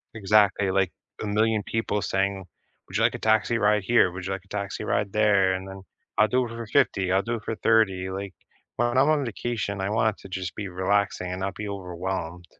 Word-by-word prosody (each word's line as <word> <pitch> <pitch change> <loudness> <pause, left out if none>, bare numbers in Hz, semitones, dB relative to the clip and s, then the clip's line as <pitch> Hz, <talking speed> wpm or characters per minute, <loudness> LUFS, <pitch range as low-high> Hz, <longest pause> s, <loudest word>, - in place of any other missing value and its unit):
Exactly, 105 -2 +3
like, 95 -2 +1 0.3
1,000,000 110 +1 +1
people 105 -1 -1
saying, 95 0 -1 0.4
"Would - - -3
you - - +2
like - - +3
a - - -5
taxi 110 +1 +2
ride 105 -1 +3
here? 110 -3 +4
Would 90 +1 -7
you 95 - -3
like 95 -1 -4
a - - -25
taxi 100 -1 -4
ride - - 0
there?" 100 -3 +4
and 95 +1 -4
then, 95 0 -9 0.3
"I'll 105 - +5
do 125 +4 +2
it - - -7
for 115 0 -6
50, 95 -3 +2
I'll 95 +1 +3
do 120 +3 -2
it 110 - -7
for 115 - -3
30," 100 -4 +2
like, 95 0 -5 0.4
when 120 +1 +1
I'm 135 +2 +5
on 155 -2 +2
vacation, 115 -4 -3
I 95 +1 -1
want 110 -1 +2
it - - -18
to 95 - -11
just 95 -1 -4
be 100 - -4
relaxing 95 0 0
and 90 +1 -5
not 95 0 -2
be 105 +2 -6
overwhelmed. 90 -2 -5
100 Hz, 225 wpm, -25 LUFS, 95-110 Hz, 0.4 s, I'll